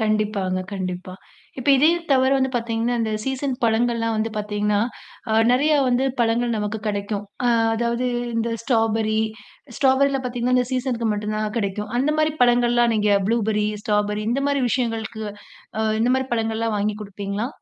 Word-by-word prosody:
கண்டிப்பாங்க, 215 -4 0
கண்டிப்பா. 185 -1 -4 0.5
இப்ப 255 - -3
இதே 290 +4 +5 0.2
தவிர 260 0 +4
வந்து 265 0 +1
பார்த்தீங்கன்னா, 230 0 -1
இந்த 220 -1 -1
சீசன் 265 0 -2
பழங்கள்லாம் 230 0 +1
வந்து 220 +1 -1
பார்த்தீங்கன்னா, 210 0 0 0.5
அ - - +1 0.2
நெறையா 295 +5 +3
வந்து 250 +1 +2 0.2
பழங்கள் 235 +1 +1
நமக்கு 210 +1 -2
கிடைக்கும். 205 0 -2 0.2
அ - - +4 0.3
அதாவது 235 +2 -1 0.3
இந்த 230 +1 0
ஸ்ட்ராபெர்ரி 225 -3 +1 0.6
ஸ்ட்ராபெரில 270 0 +3
பார்த்தீங்கன்னா, 245 0 0
இந்த 250 -1 +2
சீசனுக்கு 245 -3 -1
மட்டும் 210 +1 -3
தான் 215 0 -2
கிடைக்கும். 210 0 -3
அந்தமாரி 305 +3 +1
பழங்கள்லாம் 240 -1 +4
நீங்க 210 -1 +2 0.2
ப்ளூபெர்ரி, 215 -2 +1 0.2
ஸ்ட்ராபெர்ரி 210 0 0
இந்தமாரி 275 +2 0
விஷயங்களுக்கு 225 -2 -2 0.6
அ - - +1 0.2
இந்தமாரி 255 +3 +2
பழங்கள்லாம் 225 -1 -1
வாங்கி 210 +1 -1
குடுப்பீங்களா? 200 +3 -4
225 Hz, 140 wpm, -22 LUFS, 210-250 Hz, 0.6 s, இதே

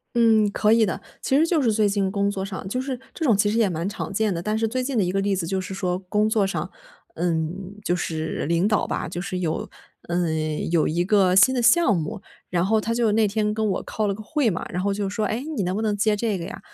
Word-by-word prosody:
嗯， 220 -3 +4
可 210 +1 +2
以 225 -1 +5
的。 190 - -2 0.2
其 265 - +2
实 315 +3 +4
就 325 -4 +1
是 230 - +2
最 210 -1 +2
近 200 -1 0
工 200 0 0
作 195 -1 -3
上， 195 -1 -6
就 250 +6 -2
是 260 -1 -4 0.2
这 325 - -3
种 235 -8 +4
其 205 +1 +2
实 215 +2 0
也 220 -3 +4
蛮 170 +2 -2
常 210 -1 -5
见 210 -1 +1
的。 170 - -3
但 215 +3 -1
是 225 - +1
最 255 +3 -2
近 255 -1 -1
的 200 - +3
一 180 - -1
个 195 - +1
例 195 0 0
子 175 -3 -2
就 190 +2 -1
是 185 - -6
说 180 -2 -1
工 210 +2 +2
作 220 -2 +2
上， 195 - -3 0.5
嗯， 175 +3 -2
就 175 - +1
是 160 -2 -3
领 170 +4 +2
导 215 0 +1
吧 - - -2
就 175 - -5
是 185 0 -4
有 165 -3 -2 0.4
嗯， 160 -3 -1
有 165 -3 +3
一 170 +3 0
个 190 -2 +3
新 260 +7 +6
的 245 - 0
项 240 - +5
目， 190 +6 -4 0.3
然 175 0 0
后 220 +2 +3
他 225 +2 -2
就 230 -2 +2
那 220 -1 +3
天 210 0 0
跟 220 0 -1
我 190 - -1
开 215 -1 -2
了 200 - 0
个 210 - -10
会 275 +1 +1
嘛， 175 - -4
然 180 +1 -2
后 200 +1 +1
就 200 0 -2
说： 210 +2 -1
“诶， 235 +5 -3
你 300 -9 -3
能 185 +1 -1
不 220 - -2
能 210 -2 0
接 210 +1 +2
这 215 -1 -1
个 170 - -5
呀？” 175 - -7
205 Hz, 295 characters per minute, -24 LUFS, 180-220 Hz, 0.5 s, 新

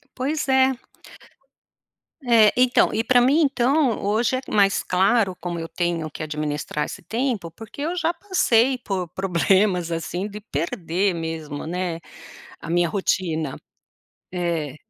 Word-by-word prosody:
Pois 285 +4 -2
é. 265 -1 +3 1.5
É 225 -3 +6
então, 250 0 +4
e 220 - +1
pra 245 +1 +4
mim 275 +6 +4
então, 270 -3 +2
hoje 220 +5 +1
é 255 - -2
mais 200 -1 +3
claro 190 +1 +2
como 175 0 -4
eu 165 0 -5
tenho 170 -3 -2
que - - -8
administrar 150 -1 -3
esse - - -8
tempo, 230 -7 -2
porque 225 - -11
eu 335 +4 -2
já 340 0 0
passei 265 - +2
por 190 -7 -3
problemas, 185 0 +1
assim, 175 +4 -3
de 210 0 -9
perder 175 +2 -1
mesmo, 160 -3 -5
né, 175 0 -3 0.6
a 165 - -9
minha 175 -1 +2
rotina. 160 -7 -1 0.8
É. 165 -6 -2
195 Hz, 135 wpm, -23 LUFS, 165-245 Hz, 1.5 s, É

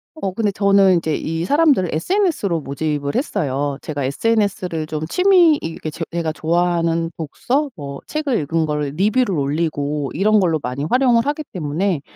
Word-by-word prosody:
어 195 -12 -3
근데 210 0 0
저는 195 -1 +4
인제 160 -3 0
이 165 +1 -3
사람들을 285 - +3
SNS로 210 - 0
모집을 145 0 -3
했어요. 145 - -1
제가 145 -3 -4
SNS를 185 0 0
좀 155 0 -3
취미 360 - +5
이 - - -6
이렇게 160 -1 -5
제 165 - -5
제가 165 -2 -1
좋아하는 165 0 0
독서 255 - -1
뭐 140 -4 -7
책을 295 -6 -1
읽은 160 +2 0
거를 150 -2 -2
리뷰를 210 -1 +2
올리고 145 -1 -1
이런 210 +4 +3
걸로 165 -5 +1
많이 125 +2 -4
활용을 245 -2 +3
하기 295 +1 -1
때문에 165 +1 -1
170 Hz, 350 characters per minute, -20 LUFS, 150-215 Hz, -, 취미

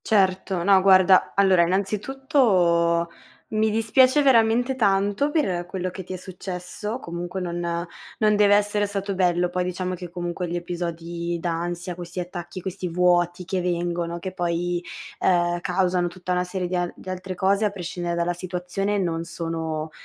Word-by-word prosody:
Certo, 190 -3 +1
no 195 0 +5
guarda, 185 -1 +5
allora 190 -3 +5
innanzitutto 190 - +2 0.4
mi 220 0 +1
dispiace 255 +6 +4
veramente 245 0 +4
tanto 205 +3 +2
per 185 - 0
quello 185 0 -3
che 190 - -7
ti 185 - -7
è - - -3
successo, 185 +4 -6
comunque 175 0 -5
non 170 -1 -3 0.3
non 215 -1 +3
deve 205 -1 +5
essere 205 0 +1
stato 200 0 -3
bello, 180 -1 +2
poi 180 +1 -1
diciamo 180 0 -3
che 180 -1 -7
comunque 175 +1 -4
gli 170 - -3
episodi 170 0 -4
d'ansia, 175 +1 -3
questi 175 +1 -7
attacchi, 175 0 -6
questi 185 0 -4
vuoti 175 0 +2
che 190 0 -1
vengono, 175 -1 -2
che 185 +2 -5
poi, 175 -1 -1 0.4
ehm, 175 -1 +2
causano 180 -1 +1
tutta 180 +1 -6
una 180 0 +1
serie 180 0 -3
di 180 - -3
a 175 -1 -1
di - - -15
altre 185 0 -5
cose, 195 +3 +2
a - - +3
prescindere 175 -2 -4
dalla 170 +1 0
situazione, 185 +3 -3
non 165 -4 -1
sono 165 -2 -4
180 Hz, 160 wpm, -24 LUFS, 175-195 Hz, 0.4 s, no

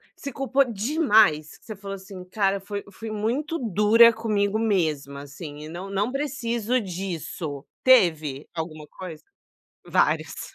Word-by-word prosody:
se 280 - -6
culpou 270 +1 +2
demais, 220 - +3
que - - -25
você 215 - -6
falou 195 0 -7
assim 190 -1 -10
"Cara, 195 +1 0
foi 200 +1 -6
fui 220 +2 -7
muito 250 +10 -2
dura 225 +1 +6
comigo 215 -2 0
mesma 155 -10 0
assim 145 +1 -9
e - - -9
não 180 +4 -7
não 200 +4 -1
preciso 250 -4 -1
disso", 170 -6 -5 0.2
teve? 155 - +4
Alguma 155 -2 -5
coisa? 170 -1 -9 0.6
Várias. - - 0
200 Hz, 135 wpm, -25 LUFS, 165-230 Hz, 0.6 s, dura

